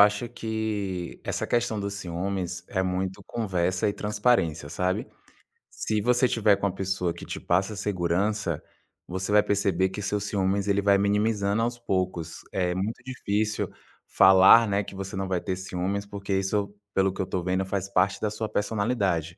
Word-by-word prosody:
acho 105 +3 +4
que 110 -6 -3
essa - - -2
questão 120 -2 0
do 100 0 -2
ciúmes 90 -1 -3
é 95 - 0
muito 95 +1 -2
conversa 95 -2 0
e 100 - 0
transparência, 105 -9 +1
sabe? 90 +3 -1 0.6
Se 110 -1 -2
você 125 +3 +3
tiver 105 -4 +3
com - - -2
uma 90 - -3
pessoa 95 -3 -1
que - - -10
te - - -5
passa 95 +4 0
segurança, 95 -1 -1 0.5
você 95 +3 -3
vai 105 0 +6
perceber 95 -2 +1
que 100 +2 -6
seu 105 0 -1
ciúmes 100 -1 0
ele 100 0 +2
vai 100 0 +4
minimizando 105 +1 +1
aos 120 +1 -1
poucos. 90 -6 -2
É 90 -2 0
muito 100 +5 -3
difícil 110 -4 -1 0.4
falar, 95 +4 +7
né, 100 0 +1
que 95 - -10
você 95 0 -5
não 95 0 -2
vai 90 -2 0
ter 95 -3 -2
ciúmes, 95 +2 -3
porque 100 -1 -5
isso, 100 +1 0 0.2
pelo 95 -1 +3
que - - -3
eu 95 - -2
tô 90 -2 -2
vendo, 95 +1 0
faz 95 0 -2
parte 100 +1 +2
da 105 -1 0
sua 110 0 -3
personalidade. 100 -6 0
100 Hz, 175 wpm, -26 LUFS, 95-105 Hz, 0.6 s, falar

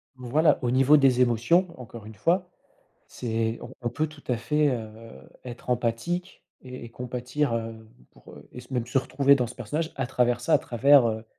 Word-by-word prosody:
Voilà, 130 +6 +2
au 120 -2 0
niveau 135 +4 +5
des 130 -3 +4
émotions, 125 - +3
encore 115 -3 -10
une 110 0 -11
fois, 175 - 0 0.6
c'est 115 -1 -3
on - - -9
on 120 - -2
peut 155 +6 -1
tout 150 -1 -16
à 125 - 0
fait, 150 +6 +1
heu, 115 -4 -4 0.5
être 125 0 -8
empathique 125 +10 -2 0.2
et 125 -1 -9
et - - -8
compatir, 125 +2 -3
heu, 115 -1 -5 0.2
pour, - - -16
heu, - - -15
et - - -10
s 125 +1 -12
même 120 -2 -1
se 125 +2 +1
retrouver 140 +1 +3
dans 125 -2 0
ce 125 - -10
personnage, 150 +7 -3
à 130 -2 -2
travers 120 -1 +1
ça, 120 - -1
à - - +6
travers, 135 +1 +4
heu, 110 0 -4
125 Hz, 200 wpm, -26 LUFS, 115-140 Hz, 0.6 s, à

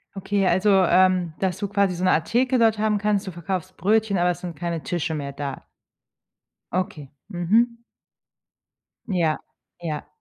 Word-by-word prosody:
Okay, 195 0 0
also, 190 +4 +3 0.2
ähm, 180 -2 +3
dass 190 -1 0
du 205 - -2
quasi 200 -2 +1
so 180 - -4
'ne 185 - +4
Art 160 - +1
Theke 255 +2 +2
dort 225 -2 +3
haben 215 -1 +2
kannst, 205 -1 0
du - - -3
verkaufst 175 +1 -5
Brötchen, 210 +1 +2
aber 180 0 +3
es - - -6
sind 175 -3 -6
keine 170 0 -3
Tische 170 -2 -2
mehr 140 -2 -4
da? 140 -1 -6 1.1
Okay, 155 -6 -3 0.2
mhm. 225 +7 +2 1.3
Ja, 170 -6 +1 0.4
ja. 155 -3 -5
185 Hz, 160 wpm, -24 LUFS, 170-205 Hz, 1.3 s, ne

